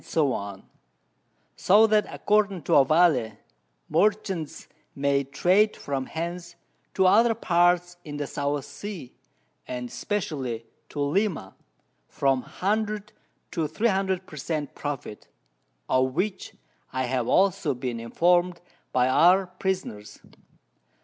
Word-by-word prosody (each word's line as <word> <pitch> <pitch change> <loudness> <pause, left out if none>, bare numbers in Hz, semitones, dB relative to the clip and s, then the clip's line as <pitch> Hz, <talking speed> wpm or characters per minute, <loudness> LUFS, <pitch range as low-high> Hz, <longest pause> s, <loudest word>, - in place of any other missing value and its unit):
_ 100 -11 -2 0.9
So 210 +4 +5
that 215 -1 +2
according 205 -5 +1
to - - -4
Ovalle, 140 -6 +4 0.5
Merchants 195 -6 0 0.3
may 140 0 +1
trade 180 +10 +2
from 135 -2 -3
hence 170 +1 -5 0.4
to 190 - +3
other 225 +5 +5
Parts 175 -3 +2
in 145 -2 -7
the 145 - -2
South 145 0 -2
Sea, 145 0 -8 0.5
and 125 -1 -5
especially 135 - -3 0.2
to 145 - -7
Lima, 150 - -1 0.5
from 135 -2 +1
100 210 - -2 0.4
to 160 -3 -1
300 190 -2 0
per 150 - -12
Cent. 150 0 -3
Profit, 140 -7 -6 0.6
of 130 0 +1
which 190 +3 -2 0.4
I 130 0 -1
have 125 -1 -1
also 185 -7 +2
been 125 -2 -4
informed 175 +8 +2 0.3
by 125 0 +3
our 180 +8 +5
Prisoners. 185 - -4
165 Hz, 110 wpm, -26 LUFS, 135-190 Hz, 0.9 s, So